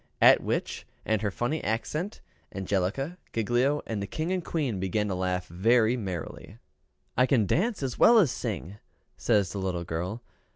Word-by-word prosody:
At - - +7
which, - - -3 0.2
and 110 -1 +1
her 105 - 0
funny 120 +10 -2
accent 150 - -2 0.3
Angelica, 100 - -1
Giglio 120 +6 +1
and 110 -3 -3
the 100 - -3
King 160 - -3
and 185 -2 -1
Queen 140 - -2
began 100 +3 0
to - - -1
laugh 90 -1 -1
very 110 +6 +3
merrily. 95 -1 -6 0.6
"I 125 +1 +4
can 120 -6 +3
dance 195 - 0
as 130 -2 -3
well 235 - +7
as 175 - +5
sing," 105 -5 -4 0.4
says 100 -3 +2
the 100 - -4
little 90 -2 -2
girl. 90 +8 -4
110 Hz, 165 wpm, -28 LUFS, 95-135 Hz, 0.6 s, At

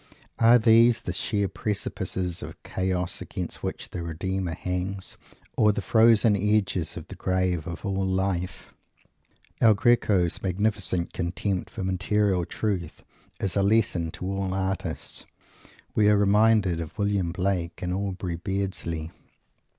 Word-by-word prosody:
Are 115 +1 +7
these 115 0 +5
the 90 - -4
sheer 100 +2 0
precipices 95 -2 -3
of - - -9
Chaos, 90 -1 -2
against - - -5
which - - -4
the 90 - -4
Redeemer 85 +1 -3
hangs, 90 +2 -3 0.4
or 105 - +5
the 105 - -2
frozen 110 -2 +5
edges 100 -4 0
of - - -8
the - - -9
grave 90 -3 0
of 85 +3 -6
all 95 -1 -1
life? 95 -1 -2 0.9
El 110 -2 +6
Greco's 100 -6 +2
magnificent 95 -2 -1
contempt 90 +1 -2
for - - -6
material 95 0 +1
truth 90 -3 -3 0.4
is 95 - -2
a 100 - +3
lesson 100 -5 +2
to - - -6
all 95 0 -2
artists. 95 0 -3 0.7
We 105 -1 +4
are 105 - +5
reminded 100 -3 +3
of 80 -1 -8
William 100 -4 0
Blake 90 -1 -2
and 90 0 -1
Aubrey 95 -3 -3
Beardsley. 90 -4 -3
95 Hz, 135 wpm, -26 LUFS, 90-105 Hz, 0.9 s, Are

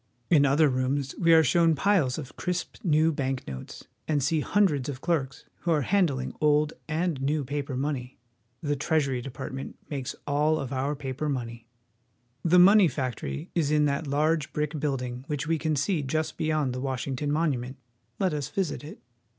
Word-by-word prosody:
In 145 -4 +6
other 150 +3 +4
rooms 130 +1 -1
we 170 -2 +4
are 160 -1 +7
shown 165 +2 +3
piles 160 -7 +2
of 150 -4 -8
crisp 180 -1 -3
new 160 -1 +3
bank 135 -3 -3
notes, 65 -1 -8 0.2
and 145 -3 +1
see 155 +4 +2
hundreds 150 -6 +1
of 130 -3 -5
clerks 135 -4 -2
who 175 - -4
are 155 -4 +3
han 195 +4 +3
dling 130 -3 -4
old 150 0 +3
and 160 -2 -1
new 145 +2 0
paper 140 -1 -3
money. 135 -2 -3 0.5
The 145 -1 0
TreasuryDepartment 135 -3 -2 0.2
makes 135 -3 -4
all 150 +2 +2
of 135 0 -4
our 135 +3 -1
pa 135 -2 -5
per 150 +3 -2
money. 120 -3 -4 0.8
The 175 +2 +4
money 195 +2 +8
factory 135 +3 -4
is 160 -4 +1
in 150 0 +3
that 140 +2 -1
large 150 +1 +1
brick 150 0 -2
building 125 -4 -2
which 150 0 -2
we 160 0 0
can 155 -1 0
see 155 +4 0
just 155 +3 -2
be - - -2
yond 155 -5 +1
the 125 - -4
Washington 135 +1 -2
Monument. 135 -5 -1 0.4
Let 185 -4 +1
us 145 -3 -2
visit 185 -7 -2
it. 150 - -9
145 Hz, 180 wpm, -27 LUFS, 135-160 Hz, 0.8 s, money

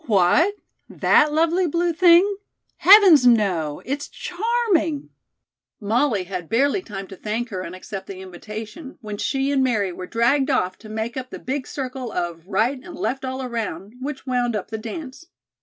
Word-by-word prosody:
"What, 220 - +3 0.3
that 300 0 +3
lovely 335 +4 +2
blue 340 +2 0
thing? 360 +4 +5 0.4
Heavens, 370 - +8
no! 185 -10 +2
it's 280 +2 -3
charming 365 -7 -1 0.3
" - - -69
Molly 220 0 +1
had 180 -3 -6
barely 280 +10 +2
time 195 - -7
to 195 - -11
thank 220 +5 -3
her 185 -5 -4
and 180 0 -7
accept 190 +1 -8
the 195 - -7
invitation, 215 - -9
when 210 -2 -6
she 270 0 0
and 270 -2 +2
Mary 215 -7 +1
were 180 +1 -7
dragged 265 +5 +2
off 185 -9 +1
to 215 - -12
make 220 +2 -4
up 255 -1 -5
the - - -7
big 265 +1 -4
circle 255 -3 -5
of 175 -1 -4
"right 240 +6 0
and 350 -2 -10
left 270 -2 -3
all 260 0 -4
around," 220 -5 -4
which 275 0 -5
wound 245 -3 0
up 210 +1 -5
the 220 - -3
dance. 265 +7 -8
250 Hz, 175 wpm, -22 LUFS, 205-295 Hz, 0.4 s, Heavens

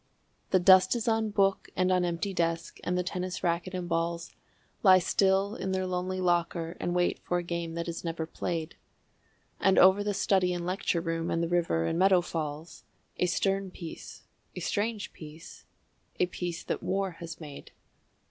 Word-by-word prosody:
The 190 - +4
dust 185 +4 +6
is 235 0 -3
on 225 -1 +2
book 195 -2 +1
and 185 0 +2
on 180 -1 +3
empty 175 +3 -2
desk, 165 -1 -1
and 180 0 -1
the 180 - +1
tennis 180 0 -4
racquet 175 +2 -1
and 180 -1 -3
balls 170 0 -2 0.5
Lie 190 -2 +8
still 195 +2 +2
in 190 -2 -3
their 185 0 0
lonely 185 +1 -2
locker 170 -1 0
and 175 - -2
wait 175 0 +1
for 175 - -1
a 175 - -2
game 170 -1 -4
that 170 0 -3
is 170 -1 -5
never 165 -1 -3
played, 165 0 -4 0.8
And 195 -1 +3
over 190 +2 +6
the 205 -1 -1
study 185 -2 +2
and 175 -1 -4
lecture 180 -2 0
room 165 -1 -2
and 165 - 0
the - - 0
river 165 - +1
and 165 - -1
meadow 190 -1 +5
falls 160 -1 -5 0.3
A 180 - +2
stern 195 +2 0
peace, 170 -2 -9 0.3
a - - -4
strange 215 0 -2
peace, 155 +1 -12 0.5
a - - +4
peace 175 -1 -5
that - - -3
War 195 0 -1
has 165 -1 -7
made. 150 -3 -10
180 Hz, 180 wpm, -29 LUFS, 170-190 Hz, 0.8 s, Lie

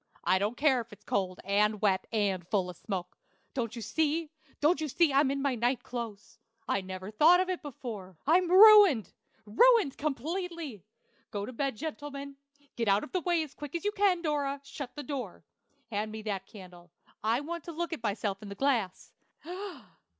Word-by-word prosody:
I 185 - +3
don't 210 +5 -1
care 275 -4 +3
if 230 0 -13
it 205 - -11
is 210 - -33
cold, 185 -2 -1
and 210 +2 +2
wet, 195 -3 +1
and 195 -5 0
full 185 -3 0
of 175 - -16
smoke. 180 -4 -5 0.3
Don't 230 -3 -3
you 230 - -6
see 310 +6 0 0.3
don't 315 +3 +3
you 310 - -1
see 305 +1 +2
I'm 275 0 +4
in 275 0 -2
my 280 -2 +1
night 245 +1 0
clothes? 230 -2 -7 0.3
I 200 - +1
never 185 +1 -7
thought 320 +11 +6
of 370 0 0
it 370 - -2
before. 220 - -8
I'm 345 +4 +4
ruined, 395 - +8 0.3
ruined 400 - +4
completely! 310 - -3 0.5
Go 205 -2 -4
to 255 - -8
bed, 275 0 -1
gentlemen; 280 -2 -6 0.4
get 230 -2 -1
out 200 +1 +3
of - - -8
the 370 - 0
way 345 -1 +1
as 295 -2 -10
quick 295 0 -8
as 340 - -3
you 415 - +2
can 390 -4 +2
Dora, 285 -3 -1
shut 280 -2 -8
the 295 - -6
door. 255 -8 -6 0.5
Hand 215 +1 -2
me 220 0 -7
that 195 -3 -3
candle; 180 -4 -13 0.3
I 230 +4 +2
want 335 +2 -5
to 340 - -6
look 335 +1 -3
at 320 - -5
myself 205 -2 -2
in 210 - -8
the 200 - -7
glass. 230 -7 -1
255 Hz, 195 wpm, -30 LUFS, 205-310 Hz, 0.5 s, ruined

